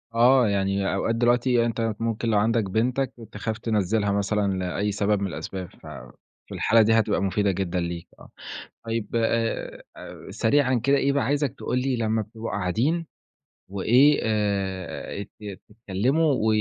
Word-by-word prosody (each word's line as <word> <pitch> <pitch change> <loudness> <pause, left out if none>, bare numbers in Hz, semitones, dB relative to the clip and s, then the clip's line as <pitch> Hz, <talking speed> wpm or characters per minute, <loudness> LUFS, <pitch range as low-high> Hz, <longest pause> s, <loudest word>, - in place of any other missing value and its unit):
آه 125 +1 +5
يعني 100 -1 0
أوقات 115 +4 0
دلوقتي 120 0 +3
أنت 115 -1 -1
ممكن 115 0 -1
لو 110 - +3
عندك 110 +2 +2
بنتك 125 +5 0 0.2
تخاف 110 +1 -4
تنَزِّلها 105 -2 0
مثلًا 100 0 0
لأي 95 +3 -1
سبب 100 0 0
من 100 - 0
الأسباب، 95 0 -6
ف - - -12 0.6
في - - -8
الحالة 115 - +4
دي 110 +1 +4
هتبقى 110 -3 +2
مفيدة 100 +1 +1
جدًا 90 -1 -2
ليك 85 -1 -4
آه، - - -14 0.6
طيب 115 -1 -2
آآ، 115 0 -1 0.5
سريعًا 130 +2 +2
كده 140 +2 +4
إيه 140 0 +2
بقى 140 -4 +1
عايزك 145 0 0
تقول 125 - -1
لي 130 0 0
لمّا 110 -1 0
بتبقوا 110 +2 -7
قاعدين 120 - 0 0.6
وإيه 125 +9 +4
آآ، 100 -3 -2
ت 100 -1 -10
تتكلِّموا 120 +9 0
و 110 - -1
110 Hz, 150 wpm, -25 LUFS, 100-120 Hz, 0.6 s, آه